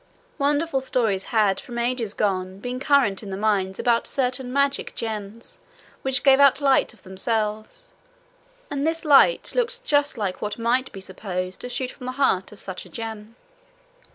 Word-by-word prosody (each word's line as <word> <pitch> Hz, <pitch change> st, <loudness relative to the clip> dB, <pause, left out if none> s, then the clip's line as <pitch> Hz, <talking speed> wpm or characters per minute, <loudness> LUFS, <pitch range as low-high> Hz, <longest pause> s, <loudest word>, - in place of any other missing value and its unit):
Wonderful 290 Hz, 0 st, +1 dB
stories 225 Hz, -7 st, 0 dB
had 210 Hz, -4 st, +2 dB
from 240 Hz, -1 st, -8 dB
ages 235 Hz, -3 st, -1 dB
gone 190 Hz, -2 st, -1 dB
been 245 Hz, +5 st, -5 dB
current 270 Hz, -8 st, +2 dB
in 205 Hz, -, -8 dB
the 190 Hz, -, -4 dB
mines 195 Hz, -2 st, 0 dB
about 235 Hz, -1 st, +2 dB
certain 255 Hz, -1 st, -1 dB
magic 280 Hz, +1 st, 0 dB
gems 220 Hz, 0 st, -5 dB, 0.4 s
which 265 Hz, -1 st, 0 dB
gave 270 Hz, -1 st, +6 dB
out 280 Hz, -1 st, +6 dB
light 275 Hz, -2 st, +3 dB
of -, -, -19 dB
themselves, 215 Hz, -, -3 dB, 0.8 s
and 285 Hz, +1 st, -1 dB
this 330 Hz, +1 st, -2 dB
light 300 Hz, -, +5 dB
looked -, -, -1 dB
just 290 Hz, -, +2 dB
like 195 Hz, -4 st, -3 dB
what 210 Hz, -, -3 dB
might 240 Hz, +3 st, 0 dB
be 195 Hz, -, -9 dB
supposed 185 Hz, -1 st, -5 dB
to 245 Hz, -, -6 dB
shoot 250 Hz, +1 st, -3 dB
from 255 Hz, -, -10 dB
the 255 Hz, -, -3 dB
heart 255 Hz, -9 st, +1 dB
of 210 Hz, -, -11 dB
such 190 Hz, -2 st, -5 dB
a -, -, -15 dB
gem. 225 Hz, -1 st, -7 dB
235 Hz, 170 wpm, -24 LUFS, 205-275 Hz, 0.8 s, gave